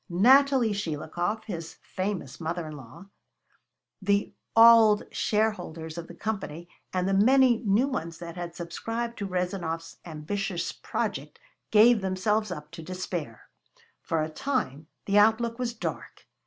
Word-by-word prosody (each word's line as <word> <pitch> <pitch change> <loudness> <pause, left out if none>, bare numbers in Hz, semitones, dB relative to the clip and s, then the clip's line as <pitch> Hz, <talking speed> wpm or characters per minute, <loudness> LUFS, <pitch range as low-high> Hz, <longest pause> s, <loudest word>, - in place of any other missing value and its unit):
Natalie 255 +5 +5
Shelikov, 175 +3 -3
his 165 -5 -6
famous 185 -8 -4
mother 165 +1 -3
in 155 -1 -7
law, 130 +6 -12 1.0
the 200 +1 +1 0.2
old 225 -2 +7
shareholders 175 -7 -1
of 170 -1 -7
the 175 - -11
Company, 175 -5 -4 0.2
and 185 0 -1
the 195 - +1
many 250 +4 +5
new 220 +4 +2
ones 165 - -4
that 170 0 -8
had 175 -1 -6
subscribed 225 +7 -4
to 200 - -3
Rezanov's 180 -3 -3
ambitious 175 +3 -3
project, - - -4 0.3
gave 220 +1 +6
themselves 200 +3 0
up 150 -4 -7
to 165 0 -9
despair. 170 -8 -6 0.5
For 160 -1 -1
a 155 - -3
time 155 - -3 0.2
the 200 +1 +4
outlook 230 +2 +3
was 245 -2 -1
dark. - - -6
190 Hz, 135 wpm, -27 LUFS, 165-220 Hz, 1.0 s, old